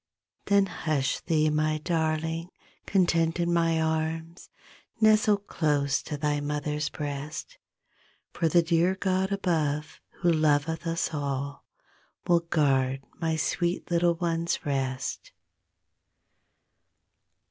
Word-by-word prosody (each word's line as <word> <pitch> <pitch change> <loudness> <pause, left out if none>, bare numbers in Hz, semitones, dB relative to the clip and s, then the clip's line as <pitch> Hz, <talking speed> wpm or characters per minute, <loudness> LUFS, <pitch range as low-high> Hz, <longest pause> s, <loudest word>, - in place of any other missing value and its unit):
Then 200 -1 +4
hush 155 -7 -1
thee 155 -2 +1
my 155 0 +1
darling 160 +1 -1 0.4
Content 170 -3 +2
in 170 0 +1
my 165 -1 +2
arms, 160 +1 -2 0.5
Nestle 215 -1 +5
close 150 -7 0
to 150 - -5
thy 145 0 0
mother's 150 0 -2
breast; 145 0 -6 0.7
For 165 - +1
the 170 +1 +4
dear 170 +2 +2
God 190 0 0
above 160 -6 -1 0.2
Who 175 - +4
loveth 155 +1 +1
us 165 0 -1
all 140 -1 -3 0.6
Will 175 -1 +4
guard 135 -5 +1 0.2
my 160 -1 0
sweet 175 +3 -1
little 170 0 +3
ones 170 0 -1
rest. 135 -2 -3
160 Hz, 105 wpm, -27 LUFS, 150-170 Hz, 0.7 s, Nestle